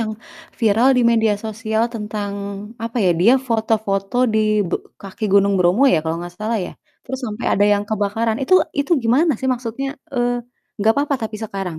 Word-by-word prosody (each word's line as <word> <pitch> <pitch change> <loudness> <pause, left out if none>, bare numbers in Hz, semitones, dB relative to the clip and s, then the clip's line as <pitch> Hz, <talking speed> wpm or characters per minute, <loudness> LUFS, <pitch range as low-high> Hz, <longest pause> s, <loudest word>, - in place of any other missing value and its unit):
yang 220 -1 -2 0.5
viral 225 +3 +4
di 250 - +3
media 225 -2 +3
sosial 220 0 -2
tentang 210 -2 -4 0.5
apa 230 +1 -5
ya, 180 - +4
dia 225 +7 +6 0.2
foto-foto 220 -2 -1 0.2
dibe 215 -4 +1 0.3
kaki 195 +3 -6
Gunung 200 0 +4
Bromo 180 +7 +3
ya? 170 - +3
Kalo 160 - -1
gak 175 0 -9
salah 220 +1 -1
ya? - - -8 0.3
Terus 265 0 -5
sampe 215 +1 -6
ada 205 - +3
yang 205 - +1
kebakaran, 220 +2 -1
itu 280 +8 +3 0.2
itu 285 +4 0
gimana 275 +8 +3
sih 260 - -1
maksudnya, 245 +2 -5 0.3
eee, 245 -1 +1 0.5
nggak 215 +2 +4
apa-apa 285 0 0
tapi 215 0 -8
sekarang, 195 -6 -5
220 Hz, 175 wpm, -20 LUFS, 200-235 Hz, 0.5 s, dia